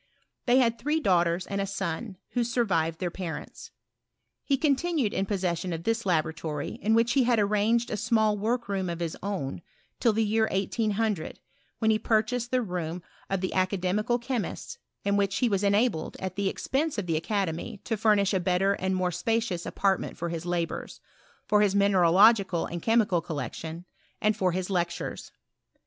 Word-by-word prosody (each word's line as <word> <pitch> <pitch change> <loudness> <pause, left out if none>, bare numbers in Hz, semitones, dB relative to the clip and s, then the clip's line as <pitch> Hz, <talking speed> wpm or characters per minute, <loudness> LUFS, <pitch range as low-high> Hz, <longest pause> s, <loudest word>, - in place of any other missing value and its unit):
They 245 +1 +5
had 235 -3 +3
three 300 +5 0
daughters 175 - +2
and 200 0 -2
a 195 - -2
son, 195 +1 -4 0.2
■who 245 - +3
survived 195 -9 0
their 180 -2 -2
parents. 175 -2 -7 0.7
He 275 - +1
continued 290 -3 +1
in 195 - -1
pos 200 -2 -2
session 175 -1 -1
of 165 0 -5
this 225 0 -1
laboratory, 160 -3 -1
in 220 +3 +3
which 230 +1 +3
he 265 -3 +3
had 240 -1 +3
arranged 215 +3 +2
a 215 - -1
small 220 -1 +2
work 235 +3 -1
room 195 -2 -1
of 170 -1 -4
his 170 -2 -3
own, 180 -8 -3 0.4
till 235 - +4
the 220 +1 +1
year 220 +1 +2
1800, 205 -2 -1 0.4
when 220 -1 +2
he 215 - +2
purchased 225 +3 0
the 255 -1 +1
room 175 -3 -4 0.3
of 195 -1 -1
the 185 - -2
Academical 190 +4 +1
Che 245 +1 -2
mists, 470 - -6 0.3
in 200 0 +2
which 195 -1 +1
he 250 - +2
was 200 -3 0
enabled, 200 -4 +1
at 185 -1 -4
the 200 0 0
expense 295 +7 -1
of 205 - -2
the 165 -2 0
academy, 190 +4 -2
to 225 - -1
fomish 210 -2 +3
a 190 - +2
better 185 +2 +2
and 190 -1 -1
more 185 -1 0
spacious 185 0 -1
apartment 195 -1 0
for 170 0 -3
his 165 +1 -5
labours, 175 -1 -3 0.5
for 210 - +3
bis 205 -2 +3
mineralogical 195 0 +4
and 170 0 -5
chemical 215 -6 +2
collection, 165 +1 -5 0.3
and 215 0 +2
for 185 -1 +1
his 185 +2 -3
lectures. 175 -2 -2
200 Hz, 180 wpm, -27 LUFS, 180-225 Hz, 0.7 s, They